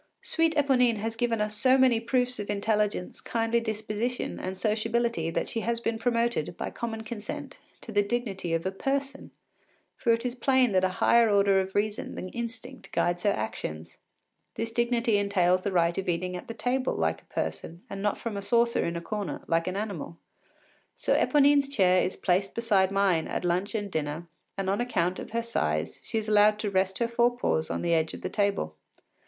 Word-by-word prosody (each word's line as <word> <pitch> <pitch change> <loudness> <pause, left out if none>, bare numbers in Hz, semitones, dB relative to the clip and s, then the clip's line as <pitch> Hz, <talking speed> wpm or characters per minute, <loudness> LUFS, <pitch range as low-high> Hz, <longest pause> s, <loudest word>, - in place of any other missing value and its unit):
Sweet 325 -1 +1
Eponine 255 -5 +3
has 225 +2 -3
given 230 -1 0
us 210 0 -1
so 255 +4 +4
many 255 -3 +4
proofs 250 +1 0
of 205 - -5
intelligence, 210 -2 -1
kindly 230 0 0
disposition, 220 +2 -3
and 185 +1 -4
sociability 220 -3 0
that - - -1
she 230 - -2
has 230 +1 -1
been 230 -1 -2
promoted, 230 -8 0
by - - -4
common 225 -1 -4
consent, 215 -1 -7 0.2
to 230 - -8
the 205 -1 +3
dignity 205 -5 -2
of 165 - -3
a 190 - 0
person, 275 +7 -3 0.7
for 235 - +1
it 230 +1 +1
is 245 - -1
plain 255 -1 +3
that 185 -1 +2
a 185 - +3
higher 235 -1 +5
order 200 -1 +4
of 190 0 -6
reason 210 +1 -1
than 185 - -5
instinct 235 +3 -7
guides 175 0 0
her 205 - +2
actions. 85 - -4 0.6
This 225 0 -3
dignity 235 -1 +1
entails 185 -3 +2
the 200 - -2
right 170 -2 +2
of 190 -1 -2
eating 180 +1 -1
at 180 - -7
table 255 +3 0
like 80 0 0
a - - -32
person, 170 +2 -4
and 195 0 -6
not 205 0 0
from 230 -3 -5
a 200 - -3
saucer 235 +2 +2
in 170 - -2
a 170 - -3
corner, 200 -2 -4
like 165 +1 +1
an 185 - -2
animal. 195 -6 -4 0.8
So - - 0
Eponine’s 285 -1 +4
chair 185 -8 +4
is 185 - -2
placed 190 +2 0
beside 205 -5 +2
mine 195 -5 +2
at - - -3
lunch 180 +5 0
and 205 -2 -3
dinner, 155 +2 -3 0.3
and 195 -1 -2
on 200 +4 +1
account 185 -7 0
of - - -7
her 230 +1 -1
size 75 - -1
she 225 - -3
is 220 -1 -2
allowed 210 0 +5
to 210 -1 -3
rest 190 0 +1
her 235 - +1
fore 240 +1 +2
paws 160 -9 0
upon - - -2
the 170 -1 +2
edge 160 -1 +1
of - - -10
the - - -3
table. 200 - 0
210 Hz, 200 wpm, -28 LUFS, 185-235 Hz, 0.8 s, higher